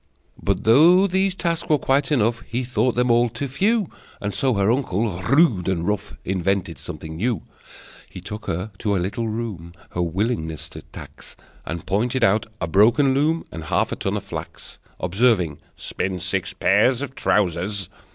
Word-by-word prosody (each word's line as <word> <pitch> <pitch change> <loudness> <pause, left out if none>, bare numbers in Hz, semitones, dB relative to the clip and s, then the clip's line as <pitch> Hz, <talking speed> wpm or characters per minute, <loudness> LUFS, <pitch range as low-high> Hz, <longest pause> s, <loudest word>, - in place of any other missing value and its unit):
But 100 +1 0
though 165 - +6
these 190 0 +1
tasks 170 -3 -2
were 155 - +5
quite 135 +2 +1
enough, 115 -4 +2
He 125 +3 -2
thought 125 0 0
them 125 0 +2
all 120 +1 +4
too 140 +5 -4
few, 200 - +1 0.3
And 105 -1 -3
so 130 -3 +1
her 100 +2 +3
uncle, 115 -4 0
rude 120 - +3
and 85 -2 -1
rough, 105 -1 -2
Invented 95 0 -1
something 80 0 -7
new. 115 +6 -1 0.7
He - - -9
took 105 +1 -8
her 90 +6 -3
to 105 -2 0
a - - +2
little 100 +6 -2
room, 105 -7 -5 0.2
Her 90 - -2
willingness 85 -3 -2
to - - -10
tax, - - -12 0.3
And 85 -1 -5
pointed 120 +6 0
out 105 +1 +3
a - - -1
broken 115 - +4
loom 155 +4 +1
And 80 -1 -7
half - - 0
a - - -1
ton - - -2
of - - -5
flax, - - -8 0.2
Observing: 95 -7 +1 0.2
"Spin 95 0 -3
six 90 +1 -2
pairs 110 +8 +3
of 135 -2 -6
trousers!" 95 -3 0
110 Hz, 170 wpm, -22 LUFS, 95-130 Hz, 0.7 s, though